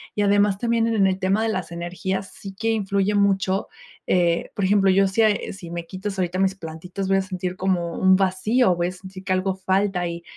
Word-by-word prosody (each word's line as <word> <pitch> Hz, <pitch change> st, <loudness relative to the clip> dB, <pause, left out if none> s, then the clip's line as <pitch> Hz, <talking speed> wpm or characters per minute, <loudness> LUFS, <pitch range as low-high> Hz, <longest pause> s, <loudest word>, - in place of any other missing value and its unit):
y 210 Hz, -, 0 dB
además 205 Hz, -1 st, +3 dB
también 235 Hz, -1 st, +1 dB
en 215 Hz, -4 st, +3 dB
el 190 Hz, -1 st, 0 dB
tema 190 Hz, +3 st, +1 dB
de 225 Hz, -, 0 dB
las 185 Hz, -5 st, -3 dB
energías 180 Hz, +3 st, -4 dB
sí 195 Hz, -1 st, -9 dB
que 225 Hz, 0 st, +1 dB
influye 200 Hz, -1 st, 0 dB
mucho. 195 Hz, -1 st, +1 dB, 0.4 s
Eh, 170 Hz, -2 st, +1 dB
por 200 Hz, -, -2 dB
ejemplo, 195 Hz, 0 st, +4 dB
yo, 195 Hz, +1 st, +4 dB
si 195 Hz, +4 st, +2 dB, 0.3 s
si 185 Hz, -3 st, -10 dB
me 170 Hz, -1 st, -5 dB
quitas 195 Hz, +2 st, -5 dB
ahorita 180 Hz, 0 st, -1 dB
mis 195 Hz, 0 st, +2 dB
plantitas, 180 Hz, +3 st, -6 dB
voy 195 Hz, 0 st, +3 dB
a -, -, +2 dB
sentir 185 Hz, -1 st, -4 dB
como 180 Hz, -3 st, -1 dB
un 190 Hz, 0 st, +5 dB
vacío. 190 Hz, +3 st, +2 dB
Voy 175 Hz, 0 st, 0 dB
a -, -, -6 dB
sentir 185 Hz, +1 st, -11 dB
que 190 Hz, -, 0 dB
algo 185 Hz, 0 st, 0 dB
falta. 190 Hz, -1 st, 0 dB
Y 170 Hz, 0 st, -6 dB
190 Hz, 215 wpm, -23 LUFS, 185-200 Hz, 0.4 s, un